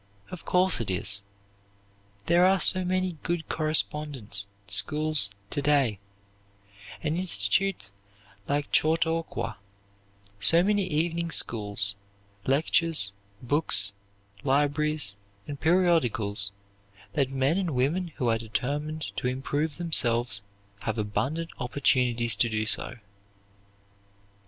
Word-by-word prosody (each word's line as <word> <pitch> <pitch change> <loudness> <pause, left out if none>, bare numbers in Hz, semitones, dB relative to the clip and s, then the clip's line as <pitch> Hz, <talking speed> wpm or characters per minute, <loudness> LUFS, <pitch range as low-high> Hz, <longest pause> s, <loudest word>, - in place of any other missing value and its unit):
Of 180 - -9
course 180 -6 +2
it 110 - -4
is. 100 +2 0 1.0
There 170 +1 +3
are 190 0 +2
so 185 +1 +4
many 185 -1 -2
good 170 -2 -3
correspondence 150 -9 0 0.2
schools 150 -2 +3 0.2
to 145 - -2
day, 140 -8 +1 1.0
and 155 +1 -1
institutions 160 - +1 0.6
like 145 0 -2
Chautauqua, 160 -6 0 0.8
so 165 - +5
many 205 -1 +1
evening 170 +1 -1
schools, 105 -8 +1 0.5
lectures, 145 -5 +3 0.3
books, 120 -7 +3 0.5
libraries, 145 -4 0 0.3
and 145 -1 -8
periodicals, 130 - +2 0.6
that 135 -3 0
men 135 +6 0
and 175 -7 -3
women 155 +9 0
who 125 - -2
are 115 -1 +1
determined 145 +7 -4
to - - -2
improve 140 +4 -3
themselves 120 -10 +2 0.4
have 110 0 -3
abundant 135 +10 -3
opportunities 125 -2 0
to 120 - +2
do 110 -1 -1
so. 115 - +2
145 Hz, 105 wpm, -26 LUFS, 115-165 Hz, 1.0 s, so